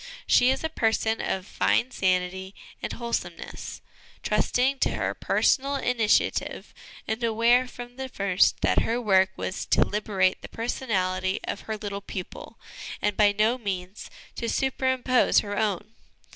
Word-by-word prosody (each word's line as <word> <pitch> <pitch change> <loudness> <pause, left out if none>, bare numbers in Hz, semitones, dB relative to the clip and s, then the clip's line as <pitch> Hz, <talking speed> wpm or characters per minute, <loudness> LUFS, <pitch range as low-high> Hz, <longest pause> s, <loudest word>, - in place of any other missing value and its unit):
She 245 - +5
is 265 +3 0
a 320 - -1
person 225 -5 0
of 190 -1 -2
fine 245 +4 +1
sanity 190 -1 -1 0.3
and - - -3
wholesomeness, 235 -1 -5 0.4
trusting 265 +2 +1
to - - +1
her - - -1
personal 275 +1 +1
initiative, 245 -5 0 0.3
and 220 +2 -2
aware 235 +3 +3
from 245 0 -10
the 265 0 -5
first 195 -5 +2
that - - +3
her 235 +2 0
work 190 -5 +4
was 185 - -3
to - - +4
liberate 195 -3 0
the - - -9
personality 190 -6 -1
of - - -4
her 220 - -2
little 200 -1 -5
pupil 190 -2 -8 0.4
and 210 -1 0
by 205 0 +5
no 215 +5 +1
means 190 -2 -5 0.3
to 235 - -2
superimpose 260 -1 +2
her 205 -1 -5
own. 210 0 -1
220 Hz, 145 wpm, -26 LUFS, 195-245 Hz, 0.4 s, She